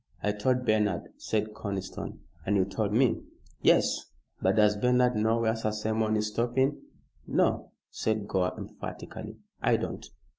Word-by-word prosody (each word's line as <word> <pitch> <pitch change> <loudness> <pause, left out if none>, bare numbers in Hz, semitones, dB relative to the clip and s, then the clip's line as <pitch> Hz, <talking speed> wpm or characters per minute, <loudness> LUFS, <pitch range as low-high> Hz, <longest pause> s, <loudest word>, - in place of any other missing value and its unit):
"I 105 - +2
told 125 +5 0
Bernard," 105 -6 +1
said 110 0 -1
Conniston, 100 -3 -5 0.2
"and 105 - +1
you 95 -2 +4
told 100 +1 -1
me." 120 +3 +3 0.4
"Yes. - - +4 0.4
But - - +3
does 105 -1 +5
Bernard 125 +3 +3
know 110 +2 +2
where 110 0 +2
Sir 110 -1 -1
Simon 110 +1 0
is 105 0 0
stopping?" 125 +6 +1 0.5
"No," - - +1 0.2
said 110 -2 -1
Gore, 90 -2 0
emphatically, - - -7 0.2
"I - - +4
don't." - - -4
110 Hz, 145 wpm, -29 LUFS, 105-115 Hz, 0.5 s, does